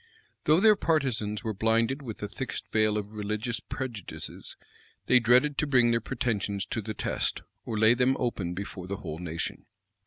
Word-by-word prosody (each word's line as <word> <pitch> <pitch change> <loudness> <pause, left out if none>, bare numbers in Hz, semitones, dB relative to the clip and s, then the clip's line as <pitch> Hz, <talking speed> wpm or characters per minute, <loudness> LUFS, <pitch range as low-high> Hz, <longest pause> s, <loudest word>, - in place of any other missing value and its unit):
Though 155 +3 +5
their 215 +1 +7
partisans 130 - 0
were 110 -2 -2
blinded 115 +6 +1
with 115 -6 -6
the 105 - -4
thickest 130 +5 -5
veil 110 -1 +2
of 105 0 -4
religious 105 +3 -2
prejudices, 120 -8 -6 0.5
they 125 - +6
dreaded 125 +5 +4
to 150 - +1
bring 125 -4 +4
their 115 0 +2
pretensions 105 -5 -2
to 115 - -1
the 110 +1 -5
test, - - -1 0.2
or 110 - -3
lay 110 +2 +6
them 130 +2 +2
open 95 -8 -2
before 95 -1 -6
the 100 +1 -3
whole 80 -3 -6
nation. 85 -1 -4
115 Hz, 175 wpm, -28 LUFS, 105-125 Hz, 0.5 s, their